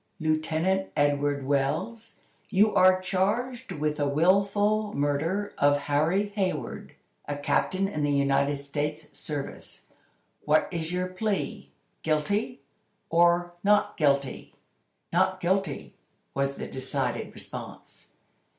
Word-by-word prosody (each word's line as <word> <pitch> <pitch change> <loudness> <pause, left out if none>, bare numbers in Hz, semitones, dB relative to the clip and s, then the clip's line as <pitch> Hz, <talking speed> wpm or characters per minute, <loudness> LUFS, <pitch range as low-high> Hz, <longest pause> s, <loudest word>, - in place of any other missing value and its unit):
"Lieutenant 160 +4 0
Edward 145 -1 +1
Wells, 150 - -1 0.3
you 210 +1 +4
are 185 0 +6
charged 220 +7 -1
with 150 0 -1
the 145 -1 +1
willful 200 +7 +2
murder 155 +8 0
of 145 0 +4
Harry 160 +8 +1
Hayward, 185 - -3 0.3
a 145 - -2
captain 185 +6 +1
in 155 -6 -3
the 145 - +1
United 140 0 +2
States 150 +2 -4
service. 145 -3 -6 0.6
What 150 +1 +3
is 165 -2 -3
your 180 0 0
plea. 205 +2 -3 0.3
Guilty, 160 +7 0 0.5
or 175 +1 +3
not 205 +1 +3
guilty!" 140 -3 0 0.6
"Not - - +2
guilty!" - - -1 0.4
was 140 0 0
the - - -5
decided 130 -1 -2
response. - - -9
160 Hz, 110 wpm, -27 LUFS, 145-195 Hz, 0.6 s, are